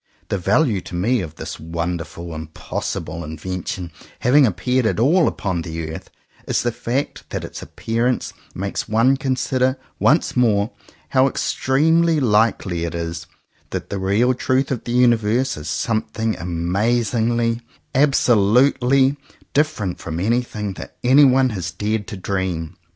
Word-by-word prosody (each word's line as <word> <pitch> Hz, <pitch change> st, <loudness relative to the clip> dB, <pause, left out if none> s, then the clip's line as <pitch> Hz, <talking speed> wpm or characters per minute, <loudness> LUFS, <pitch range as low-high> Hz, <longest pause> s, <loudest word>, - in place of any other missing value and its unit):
The 100 Hz, -, -1 dB
value 105 Hz, -, +2 dB
to 85 Hz, -, -8 dB
me 115 Hz, +8 st, +1 dB
of 80 Hz, -3 st, -7 dB
this -, -, -7 dB
wonderful 85 Hz, +1 st, -4 dB
impossible 80 Hz, +1 st, -5 dB
invention 85 Hz, +3 st, -5 dB, 0.3 s
having 135 Hz, +2 st, +5 dB
appeared 115 Hz, +6 st, +1 dB
at 110 Hz, -, 0 dB
all 160 Hz, +8 st, +4 dB
upon 95 Hz, -4 st, -2 dB
the 80 Hz, -1 st, -5 dB
earth, -, -, -9 dB, 0.4 s
is -, -, +1 dB
the 120 Hz, -, +1 dB
fact 120 Hz, +4 st, -3 dB
that -, -, -4 dB
its -, -, -7 dB
appearance 120 Hz, +2 st, -1 dB, 0.2 s
makes 100 Hz, +1 st, -3 dB
one 115 Hz, +5 st, +4 dB
consider 130 Hz, 0 st, 0 dB, 0.2 s
once 155 Hz, +4 st, +3 dB
more, 110 Hz, -3 st, +2 dB, 0.4 s
how 130 Hz, 0 st, +4 dB
extremely 160 Hz, +5 st, +2 dB
likely 105 Hz, -7 st, +2 dB
it 85 Hz, 0 st, -3 dB
is 85 Hz, 0 st, -4 dB, 0.4 s
that -, -, -5 dB
the 100 Hz, -, -2 dB
real 105 Hz, +7 st, +2 dB
truth 130 Hz, +2 st, 0 dB
of 125 Hz, -, -3 dB
the 120 Hz, -, -3 dB
universe 120 Hz, +1 st, +3 dB
is 75 Hz, +1 st, -6 dB
something 110 Hz, +3 st, -1 dB
amazingly, 115 Hz, +7 st, 0 dB, 0.3 s
absolutely 130 Hz, +1 st, +4 dB, 0.4 s
different 140 Hz, -, 0 dB
from 80 Hz, 0 st, -5 dB
anything 105 Hz, -1 st, -1 dB
that -, -, -9 dB
anyone 130 Hz, 0 st, +5 dB
has 90 Hz, -6 st, -3 dB
dared 105 Hz, +4 st, -2 dB
to 105 Hz, -, -6 dB
dream. 90 Hz, -3 st, -3 dB
110 Hz, 135 wpm, -21 LUFS, 90-130 Hz, 0.4 s, having